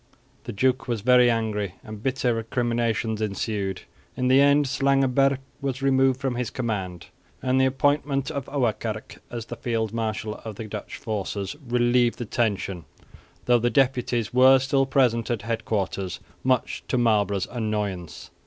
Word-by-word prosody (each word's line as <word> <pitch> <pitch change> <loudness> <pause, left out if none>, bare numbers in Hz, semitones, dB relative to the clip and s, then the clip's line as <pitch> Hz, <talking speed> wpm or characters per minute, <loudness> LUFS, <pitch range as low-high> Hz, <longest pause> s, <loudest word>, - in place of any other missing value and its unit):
The - - -4
duke 130 +6 +1
was 120 -4 -2
very 125 +1 +5
angry, 105 -5 -1
and 110 -1 -9
bitter 130 -1 0
recriminations 115 -1 -1
ensued. 100 -2 -2 0.3
In 125 0 +1
the 130 +2 +6
end 145 +1 +5
Slangenburg 135 0 +2 0.2
was 135 -1 -3
removed 135 -1 +3
from 135 -2 -1
his 120 -1 -2
command; 95 -8 -4 0.4
and 130 0 +2
the 130 - +4
appointment 140 +1 +1
of 140 -4 -4
Ouwerkerk, 110 -5 -2
as 120 -2 -5
field 115 -3 -3
marshal 110 -1 -3
of 110 -2 -6
the 110 - -6
Dutch 105 -1 -7
forces, 100 +1 -4
relieved 120 0 +2
the 120 - -4
tension, 100 -6 -1 0.6
though 120 -1 +4
the 120 +1 +1
deputies 120 -3 +1
were 130 +1 +7
still 135 +1 +1
present 125 -4 +2
at 115 -4 -2
headquarters, 105 -4 -2 0.2
much 130 -2 0
to 130 - 0
Marlborough's 105 -5 +2
annoyance. 105 -7 -3
120 Hz, 145 wpm, -25 LUFS, 110-130 Hz, 0.6 s, were